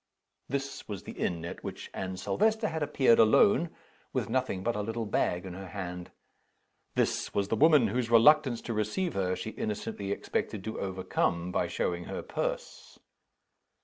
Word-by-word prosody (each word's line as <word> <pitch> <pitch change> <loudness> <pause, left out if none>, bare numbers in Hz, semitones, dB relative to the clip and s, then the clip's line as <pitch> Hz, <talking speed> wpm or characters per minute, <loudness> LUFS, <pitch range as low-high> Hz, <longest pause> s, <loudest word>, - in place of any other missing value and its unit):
This 140 +1 -4
was 100 -4 -6
the - - -7
inn 85 -1 -2
at 85 - -7
which - - -7
Anne 95 -1 -4
Silvester 215 - +1
had 160 - -3
appeared 135 -5 +4
alone, 160 - +5 0.4
with - - -1
nothing 95 -1 0
but 120 +2 0
a 105 - -1
little 115 +2 -3
bag 90 -3 0
in 95 - -6
her 95 +1 -8
hand. 90 -1 -6 0.9
This - - 0
was 100 0 +1
the - - +2
woman 145 -3 +5
whose 120 +2 -1
reluctance 125 +1 +5
to 115 - -4
receive 110 - -1
her 90 -1 0
she 110 - -5
innocently 105 -2 -4
expected 100 0 -2
to 110 - -4
overcome 90 -2 -1
by - - 0
showing 85 0 -2
her - - -5
purse. - - -4
110 Hz, 165 wpm, -30 LUFS, 95-135 Hz, 0.9 s, alone